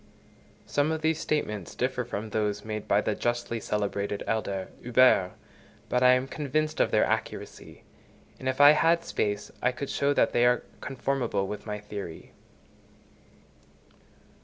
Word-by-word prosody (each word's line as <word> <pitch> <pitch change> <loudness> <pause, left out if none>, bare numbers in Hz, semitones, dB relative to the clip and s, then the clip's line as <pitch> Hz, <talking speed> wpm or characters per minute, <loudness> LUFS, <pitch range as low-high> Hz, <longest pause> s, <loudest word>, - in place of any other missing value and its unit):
Some 145 +2 +1
of 160 -1 -3
these 160 0 +1
statements 105 - -2
differ 125 0 -1
from 110 -2 -5
those 105 -1 -1
made 110 -1 -5
by 100 - +3
the 110 - -1
justly 120 +1 -2
celebrated 100 -1 -2
elder 100 -4 -2
Huber, 125 -6 +4 0.6
but 125 - +1
I 125 0 +7
am 125 +1 +1
convinced 155 +2 -2
of - - +3
their - - +3
accuracy; - - -4 0.6
and 130 - -2
if 130 - -2
I 145 +1 +10
had 165 +2 +3
space, 105 -9 -2
I 125 - +2
could 135 +2 -5
show 140 0 +1
that - - +2
they 120 0 +4
are 125 0 +2 0.2
conformable 130 -6 -2
with 105 +3 -7
my 105 0 -3
theory. 100 -5 -8
120 Hz, 150 wpm, -27 LUFS, 105-140 Hz, 0.6 s, I